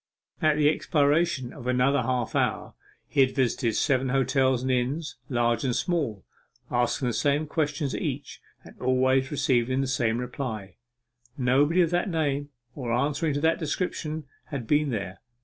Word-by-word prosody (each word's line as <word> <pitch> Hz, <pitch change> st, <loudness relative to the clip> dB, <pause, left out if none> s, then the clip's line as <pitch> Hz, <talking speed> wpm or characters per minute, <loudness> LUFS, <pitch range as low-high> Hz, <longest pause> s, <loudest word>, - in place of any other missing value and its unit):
At 155 Hz, -1 st, +3 dB
the 150 Hz, -1 st, +4 dB
expiration 150 Hz, -3 st, +1 dB
of 125 Hz, -5 st, -9 dB
another 125 Hz, +2 st, +3 dB
half 125 Hz, -1 st, -1 dB
hour -, -, 0 dB, 0.3 s
he 145 Hz, -, -2 dB
had 130 Hz, -1 st, +2 dB
visited 120 Hz, -4 st, +1 dB
seven 130 Hz, -3 st, +1 dB
hotels 130 Hz, -1 st, +2 dB
and 130 Hz, -, 0 dB
inns, 135 Hz, +5 st, -1 dB
large 120 Hz, -1 st, +1 dB
and 125 Hz, -3 st, 0 dB
small, 145 Hz, -, -1 dB, 0.5 s
asking 120 Hz, +1 st, +1 dB
the -, -, -2 dB
same 145 Hz, +5 st, +1 dB
questions 150 Hz, -2 st, -1 dB
at -, -, -3 dB
each, 140 Hz, -2 st, -4 dB, 0.2 s
and -, -, -14 dB
always 130 Hz, +1 st, +2 dB
receiving 130 Hz, -3 st, +1 dB
the -, -, 0 dB
same 120 Hz, -3 st, 0 dB
reply 120 Hz, -6 st, -5 dB, 0.6 s
nobody 140 Hz, +7 st, +3 dB
of 165 Hz, -, -1 dB
that 175 Hz, +3 st, +1 dB
name, 145 Hz, -4 st, -1 dB, 0.2 s
or 125 Hz, -4 st, -4 dB
answering 145 Hz, +5 st, 0 dB
to 145 Hz, -, -1 dB
that 160 Hz, +1 st, +2 dB
description, 155 Hz, -1 st, -3 dB, 0.2 s
had 140 Hz, -6 st, -5 dB
been 150 Hz, +4 st, +2 dB
there. 100 Hz, -6 st, -4 dB
135 Hz, 160 wpm, -26 LUFS, 125-150 Hz, 0.6 s, the